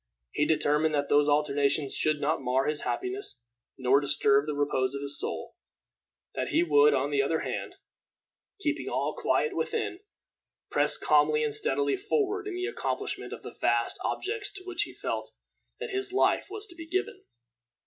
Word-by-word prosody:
He 150 - +1
determined 155 0 +2
that 145 -1 -1
these 145 0 +4
alternations 145 -1 +2
should 155 -1 +1
not 150 +2 0
mar 130 +2 +1
his 150 0 -1
happiness, 380 - -3 0.3
nor 130 +1 +4
disturb 140 0 +3
the 150 - -2
repose 140 -2 0
of 140 - -4
his 140 0 -3
soul; - - -4 0.8
that - - -2
he - - +2
would, 145 -2 +5
on 135 +2 0
the 140 -1 +3
other 160 +4 0
hand, - - -4 0.8
keeping 305 -4 -1
all - - -1
quiet 460 - +1
within, 425 -6 -2 0.7
press - - +2
calmly 455 0 +3
and 445 -1 -1
steadily 425 -2 +1
forward 415 0 -1
in 395 - -4
the 365 +1 -2
accomplishment 450 - -3
of - - -8
the - - -9
vast - - +2
objects 415 +1 -2
to 385 -2 -4
which 370 -2 -2
he - - -11
felt - - -4 0.5
that - - -5
his 390 -1 -1
life 385 - +2
was 420 +1 -5
to 350 - -14
be 330 -1 -9
given. 375 +4 -2
155 Hz, 170 wpm, -28 LUFS, -, 0.8 s, would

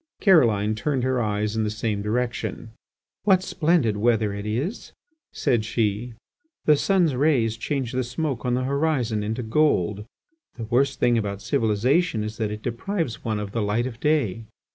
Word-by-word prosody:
Caroline 115 - +4
turned 130 +3 -1
her 130 -1 +1
eyes 105 0 -1
in 110 - +1
the 105 - 0
same 105 -1 -2
direction. 115 +1 -3 0.5
"What 190 -3 +3
splendid 155 - +1
weather 110 -1 +2
it 100 +1 -5
is!" 135 - -3 0.4
said 120 -6 +1
she. 110 +1 -1 0.5
"The 150 - +6
sun's 175 -1 +2
rays 125 -5 +2
change 130 +1 -3
the 130 0 -1
smoke 130 +1 -3
on 125 -1 +1
the 130 - -1
horizon 135 -5 0
into 110 +4 -3
gold. 105 - +1 0.5
The 115 - -5
worst 130 +4 +1
thing 120 -1 +3
about 100 -2 -3
civilization 115 - +1
is 110 +1 -5
that 110 -2 -1
it 105 0 -6
deprives 165 - -3
one 110 -2 -1
of 105 -1 -5
the 115 - -1
light 105 +4 0
of 120 -3 -6
day." 115 -9 0
115 Hz, 165 wpm, -24 LUFS, 105-140 Hz, 0.5 s, The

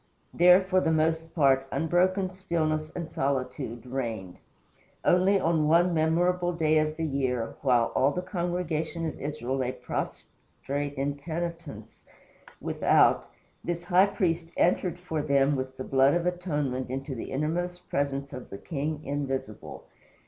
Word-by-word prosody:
There, 180 +2 +7
for 185 0 +2
the 160 - +1
most 160 +1 0
part, 135 -4 +3
unbroken 180 +5 +1
stillness 155 -4 -1
and 170 -2 -4
solitude 130 -5 -3
reigned. 115 -8 -4 0.7
Only 190 +2 +4
on 160 -3 +2
one 170 +3 +4
memorable 175 +3 +2
day 155 -2 +3
of 155 0 -1
the 165 - -2
year, 130 -5 -1
while 125 -4 +3
all 135 - +3
the 180 +5 -3
congregation 170 -2 -2
of 160 - -5
Israel 135 -3 -3
lay 130 -1 -1
prostrate 145 +1 -5
in 140 +1 -2
penitence 165 -7 -6 0.6
without, - - +3 0.3
this 175 0 -3
high 185 +2 +5
priest 170 -5 -1
entered 180 0 +2
for 170 -4 -3
them 140 0 +2
with 130 0 -4
the 130 - -4
blood 135 +3 +3
of 175 0 0
atonement 150 -8 -2
into 135 +2 -4
the 120 - -6
innermost 175 +5 -2
presence 140 0 -2
of 130 -2 -8
the 100 - -7
King 150 - -4
Invisible. 140 -2 -4
155 Hz, 140 wpm, -28 LUFS, 135-175 Hz, 0.7 s, There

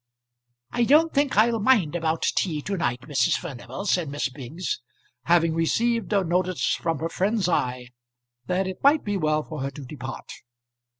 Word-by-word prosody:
"I 240 - +1
don't 310 +6 +4
think 280 -5 +1
I'll 225 +1 +4
mind 205 - +3
about 160 -1 -1
tea 155 -6 0
to 200 - -2
night, 125 -9 -1
Mrs. 130 -2 +1
Furnival," 135 +1 -7
said 180 -6 +1
Miss 145 -1 -2
Biggs, 140 +5 -5 0.4
having 165 -1 +3
received 230 +9 0
a 200 -2 +3
notice 180 +1 0
from 165 -2 -1
her 165 +3 -3
friend's 195 +2 0
eye 125 -7 -1 0.6
that 185 +1 0
it 185 0 -6
might 290 +2 +4
be 205 -1 -2
well 155 -4 +1
for 155 -2 -7
her 135 - -2
to 140 0 -10
depart. 130 -1 -8
170 Hz, 170 wpm, -25 LUFS, 145-205 Hz, 0.6 s, don't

